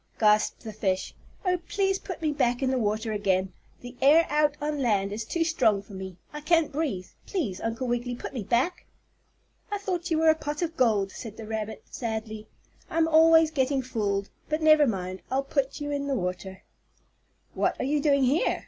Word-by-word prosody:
gasped 210 Hz, -1 st, +3 dB
the 220 Hz, -, -7 dB
fish. 190 Hz, -3 st, -1 dB, 0.3 s
"Oh, 360 Hz, -1 st, +2 dB
please 390 Hz, -1 st, +1 dB
put 360 Hz, -3 st, -7 dB
me 310 Hz, -, +2 dB
back 245 Hz, -3 st, 0 dB
in 260 Hz, -, +2 dB
the 260 Hz, -, +1 dB
water 220 Hz, +1 st, -1 dB
again. 190 Hz, -2 st, 0 dB, 0.3 s
The 245 Hz, 0 st, -9 dB
air 305 Hz, +5 st, +6 dB
out 295 Hz, 0 st, +2 dB
on 295 Hz, 0 st, -2 dB
land 200 Hz, -5 st, +1 dB
is 220 Hz, +1 st, -4 dB
too 335 Hz, +8 st, 0 dB
strong 230 Hz, -11 st, +2 dB
for 200 Hz, -, -14 dB
me. 190 Hz, -2 st, -7 dB, 0.2 s
I 300 Hz, -, -6 dB
can't 325 Hz, 0 st, +2 dB
breathe. 275 Hz, -, -2 dB, 0.2 s
Please, 245 Hz, -, -2 dB
Uncle 225 Hz, +3 st, -2 dB
Wiggily, 240 Hz, 0 st, -1 dB
put -, -, -7 dB
me 250 Hz, -, -3 dB
back." 255 Hz, -, 0 dB, 0.8 s
"I 410 Hz, -, 0 dB
thought 365 Hz, -3 st, -3 dB
you 325 Hz, -, +1 dB
were 320 Hz, 0 st, +5 dB
a -, -, +1 dB
pot 295 Hz, +1 st, -4 dB
of 330 Hz, -1 st, -3 dB
gold," 210 Hz, -6 st, +2 dB
said 220 Hz, -3 st, -9 dB
the 225 Hz, -, -7 dB
rabbit, 220 Hz, 0 st, -4 dB
sadly. 220 Hz, -2 st, -4 dB, 0.4 s
"I'm 320 Hz, 0 st, +2 dB
always 325 Hz, 0 st, +6 dB
getting 270 Hz, -2 st, +1 dB
fooled. 205 Hz, -5 st, -2 dB, 0.2 s
But 310 Hz, +1 st, -1 dB
never 310 Hz, -2 st, +6 dB
mind. 185 Hz, -3 st, -3 dB
I'll 270 Hz, +1 st, 0 dB
put 275 Hz, -1 st, -1 dB
you 290 Hz, 0 st, -4 dB
in 280 Hz, -1 st, -2 dB
the 275 Hz, -, 0 dB
water." 185 Hz, -1 st, -4 dB, 0.9 s
"What -, -, 0 dB
are -, -, -1 dB
you 290 Hz, +2 st, +1 dB
doing 280 Hz, -2 st, +3 dB
here?" 270 Hz, +6 st, +2 dB
260 Hz, 195 wpm, -27 LUFS, 215-310 Hz, 0.9 s, air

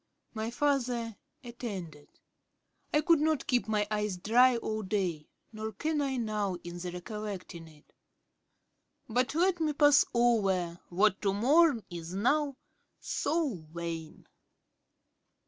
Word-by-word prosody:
My 220 Hz, 0 st, -3 dB
father 245 Hz, -4 st, 0 dB, 0.3 s
attended. 195 Hz, -, -7 dB, 0.8 s
I 300 Hz, -, +3 dB
could 330 Hz, 0 st, +4 dB
not 310 Hz, -2 st, +1 dB
keep 245 Hz, -3 st, +1 dB
my 210 Hz, -1 st, +1 dB
eyes 210 Hz, -3 st, -1 dB
dry 240 Hz, +6 st, +4 dB
all 220 Hz, -1 st, -3 dB
day; 185 Hz, -6 st, -2 dB, 0.2 s
nor 220 Hz, 0 st, -5 dB
can 305 Hz, +8 st, -1 dB
I 270 Hz, -2 st, -1 dB
now 210 Hz, -5 st, -1 dB
in 175 Hz, 0 st, -7 dB
the 180 Hz, 0 st, -5 dB
recollecting 185 Hz, -2 st, -7 dB
it; 155 Hz, -1 st, -20 dB, 1.1 s
but 250 Hz, +3 st, 0 dB
let 355 Hz, +1 st, +2 dB
me 310 Hz, -2 st, +1 dB
pass 290 Hz, -1 st, +6 dB
over 195 Hz, -8 st, +1 dB
what 195 Hz, +3 st, +2 dB
to 195 Hz, -1 st, +1 dB
mourn 275 Hz, +2 st, +4 dB
is 170 Hz, +1 st, -6 dB
now 275 Hz, +6 st, +1 dB, 0.4 s
so 285 Hz, -, -1 dB
vain.' 165 Hz, -2 st, -6 dB
220 Hz, 125 wpm, -30 LUFS, 185-265 Hz, 1.1 s, pass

